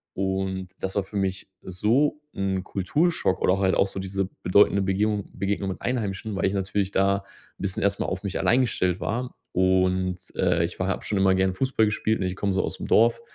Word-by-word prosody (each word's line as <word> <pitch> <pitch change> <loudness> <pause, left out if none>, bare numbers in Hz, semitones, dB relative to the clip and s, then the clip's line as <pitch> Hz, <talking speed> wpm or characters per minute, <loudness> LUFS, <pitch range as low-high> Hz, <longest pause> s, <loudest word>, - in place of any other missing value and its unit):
Und 95 -1 -2
das 95 0 -3
war 100 - +1
für 100 - -13
mich 95 0 -2
so 115 +11 +1 0.2
'n 95 -1 -1
Kulturschock 120 - 0
oder 95 +1 +3
halt 95 -1 +2
auch 100 - +3
so 95 - -6
diese 95 0 -2
bedeutende 100 +1 +4
Begebung 100 +1 0
Begegnung 100 0 -2
mit 95 - -6
Einheimischen. 110 -4 -2
Weil - - 0
ich 95 - +1
natürlich 100 0 -1
da 100 0 +3 0.4
'n - - -10
bisschen 95 -1 -2
erst 100 0 +1
mal - - 0
auf 95 +1 -4
mich 100 - -3
allein 125 +2 +3
gestellt 90 -7 0
war 125 +3 -3 0.2
und, 95 0 +2 0.2
äh, 85 - +2
ich 85 - -7
war 95 - 0
habe 95 - -2
schon 105 - -1
immer 95 -1 +4
gern 95 0 +2
Fußball 130 -1 +2
gespielt, 110 +1 0
ne, 95 - -1
und - - -2
ich 90 - -7
komme 100 -2 0
so 95 - +1
aus - - -4
dem - - -6
Dorf 115 - +4
95 Hz, 220 wpm, -25 LUFS, 95-105 Hz, 0.4 s, bedeutende